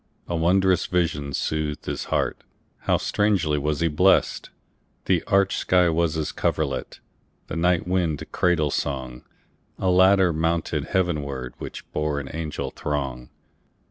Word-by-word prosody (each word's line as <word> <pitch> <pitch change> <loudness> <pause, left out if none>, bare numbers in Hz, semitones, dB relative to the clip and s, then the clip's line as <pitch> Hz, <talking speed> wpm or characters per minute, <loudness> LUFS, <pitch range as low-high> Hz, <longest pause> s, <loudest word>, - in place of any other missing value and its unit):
A 85 - -2
wondrous 90 +2 +3
vision 80 -5 0
soothed 75 +1 -2
his - - -3
heartHow - - -2
strangely 95 -8 +1
was 75 +2 -1
he 85 - +3
blessed! 90 +5 +2 0.6
The 90 -3 +2
arched 100 -2 +2
sky 90 -1 +3
was 80 -1 +1
his 80 -1 -2
coverlet, 70 -4 -2 0.5
The - - -6
night 90 +1 +1
wind 90 -5 0
cradle 85 -5 +2
song;A 65 +7 -5
ladder 95 -1 +5
mounted 80 -2 -1
heavenwardWhich 75 -9 -3
bore 75 -1 -1
an 70 - -7
angel 80 -2 -4
throng. 65 -4 -4
80 Hz, 120 wpm, -24 LUFS, 75-90 Hz, 0.6 s, ladder